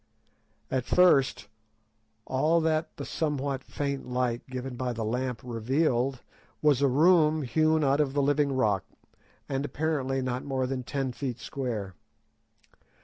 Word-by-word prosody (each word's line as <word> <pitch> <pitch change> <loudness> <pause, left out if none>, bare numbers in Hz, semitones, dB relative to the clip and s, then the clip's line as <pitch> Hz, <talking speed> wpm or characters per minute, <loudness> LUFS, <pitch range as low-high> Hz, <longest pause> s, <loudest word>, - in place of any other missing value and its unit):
At 130 -1 0
first, 140 -9 +3 0.8
all 155 +6 +2
that 160 0 -1
the - - -5
somewhat 140 -3 -2
faint 140 -2 -4
light 125 -1 0
given 130 0 -5
by 125 0 -2
the 115 -1 -3
lamp 125 +2 -2
revealed 125 +2 0 0.4
was 145 -3 +3
a 140 - +5
room 155 +2 +4
hewn 155 +4 +2
out 140 +1 +2
of 135 -3 0
the 145 - +2
living 145 0 +2
rock, 105 -8 +1 0.6
and 135 0 -2
apparently 145 -2 -1
not 125 -1 -2
more 135 -2 -1
than 130 0 -2
ten 135 +1 -3
feet 125 -1 -4
square. 115 -9 -4
135 Hz, 140 wpm, -28 LUFS, 125-145 Hz, 0.8 s, a